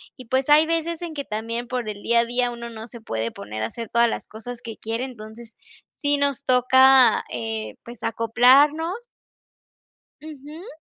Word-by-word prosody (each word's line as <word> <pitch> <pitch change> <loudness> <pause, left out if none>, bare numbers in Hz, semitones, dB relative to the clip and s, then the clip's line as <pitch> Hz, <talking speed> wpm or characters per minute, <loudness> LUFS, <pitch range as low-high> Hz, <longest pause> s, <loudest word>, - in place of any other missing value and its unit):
y 255 - -12
pues 260 +4 0
hay 300 +2 +6
veces, 330 0 -2
en 340 -2 -6
que 285 -2 -5
también 230 +3 -4
por 245 -3 -3
el 205 -1 -7
día 235 +2 +3
a - - -1
día, 245 +1 0
uno 235 0 -7
no 225 0 -9
se 235 0 -12
puede 115 - -3
poner 105 +2 -8
a - - 0
hacer 230 - -7
todas 235 0 +3
las - - -5
cosas 230 +2 -9
que 225 -1 -8
quiere. 225 +2 -4
Entonces 230 -2 -10 0.4
sí 290 0 +1
nos 280 -2 -1
toca, 260 +1 +5
eh, 110 -3 -5
pues 235 -1 -12
acoplarnos 280 - +3 1.2
Ujú. 310 - -11
240 Hz, 175 wpm, -23 LUFS, 225-280 Hz, 1.2 s, hay